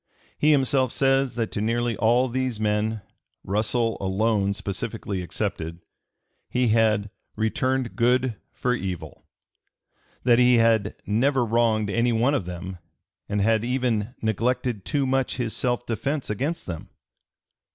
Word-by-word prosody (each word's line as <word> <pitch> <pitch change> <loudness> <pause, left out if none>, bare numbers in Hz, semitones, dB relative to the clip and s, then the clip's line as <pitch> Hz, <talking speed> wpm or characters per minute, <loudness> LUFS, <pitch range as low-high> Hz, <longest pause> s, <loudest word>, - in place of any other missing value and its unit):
He 150 - +2
himself 135 -3 +3
says 135 -1 +2
that 115 -2 -2
to 105 - -2
nearly 115 +1 0
all 120 +5 +3
these 130 -2 -2
men 105 0 0 0.4
Russell 110 +3 0
alone 100 +1 +1
specifically 100 -1 -4
excepted 85 -1 -4 0.7
he 125 -1 +1
had 110 -2 +2 0.2
"returned 125 +3 0
good 125 0 +2 0.2
for 125 - -1
evil," 95 -7 -5 1.0
that 120 -1 +5
he 125 0 +6
had 115 -3 +3
"never 125 +4 +2
wronged 110 -2 +1
any 115 +2 +2
one 120 +5 +2
of 120 -11 0
them," 90 +1 -6 0.5
and 105 0 0
had 110 +1 +2
even 125 -2 -1
"neglected 115 0 0
too 145 -3 0
much 135 0 0
his 120 -3 -2
self 120 -1 -1
defence 125 +4 -2
against 140 +11 -2
them." 85 -3 -6
115 Hz, 130 wpm, -25 LUFS, 105-125 Hz, 1.0 s, he